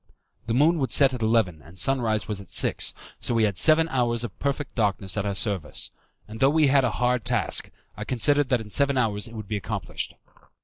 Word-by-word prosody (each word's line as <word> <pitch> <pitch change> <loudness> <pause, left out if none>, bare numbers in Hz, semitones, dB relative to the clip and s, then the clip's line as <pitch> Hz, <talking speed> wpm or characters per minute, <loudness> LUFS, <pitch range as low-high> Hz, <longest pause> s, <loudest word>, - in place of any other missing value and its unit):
The 115 - 0
moon 160 +5 +4
would 135 - -1
set 135 -2 +4
at 125 - -5
eleven 110 -8 +1
and 85 +6 -16
sunrise 110 0 0
was 105 -2 -4
at 100 - -14
six, - - 0 0.2
so 120 - -1
we 115 - +3
had 100 -2 +1
seven 160 - +4
hours 120 -4 0
of 110 -6 -6
perfect 140 0 -2
darkness 100 -4 0
at 100 -1 -1
our 100 - -2
service; 95 -7 -2 0.4
and 110 +1 -9
though 135 - +5
we 155 +1 +3
had 135 0 +4
a 125 - +2
hard 125 -1 +1
task, 115 - 0 0.3
I 105 - -6
considered 140 +4 +1
that 125 -3 +2
in 105 -1 -11
seven 140 +1 +2
hours 110 -3 0
it 115 - -12
would 110 -2 -7
be 105 - -2
accomplished. 100 - -5
115 Hz, 220 wpm, -25 LUFS, 105-135 Hz, 0.4 s, though